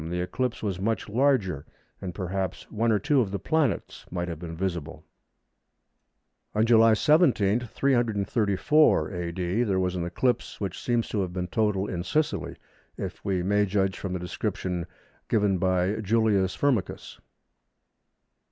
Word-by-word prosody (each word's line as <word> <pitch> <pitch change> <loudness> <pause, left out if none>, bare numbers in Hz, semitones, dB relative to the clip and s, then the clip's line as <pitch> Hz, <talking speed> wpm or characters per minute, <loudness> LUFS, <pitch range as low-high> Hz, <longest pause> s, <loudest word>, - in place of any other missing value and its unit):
the 90 +1 -2
eclipse 120 +8 -2
was 95 -4 -2
much 110 +2 -1
larger, 110 - +1 0.4
and 90 -2 -5
perhaps 95 -1 -3
one 115 +2 +1
or 105 - +4
two 145 +4 +2
of 105 - -1
the 100 - -2
planets 145 - -1
might 90 -1 -3
have 85 -3 -5
been 85 -1 -7
visible. 85 -4 -4 1.5
On 110 +1 +3
July 115 -1 +6
17, 120 - +3
334 115 - +2
A.D., 90 +3 -2
there 95 -5 0
was 90 0 0
an 90 - -2
eclipse, 120 +8 -1
which 95 -3 -4
seems 120 -2 0
to 105 - -1
have 90 -2 -3
been 90 -1 -2
total 105 -1 +1
in 90 -3 -4
Sicily, 150 - -1 0.4
if - - -6
we 95 -3 0
may 105 +2 +2
judge 95 -1 0
from 95 -2 -4
the - - -1
description 90 0 -3 0.4
given 100 -4 +2
by 95 +1 +1
Julius 105 -3 +2
Firmicus. 130 -9 -1
100 Hz, 145 wpm, -26 LUFS, 90-115 Hz, 1.5 s, July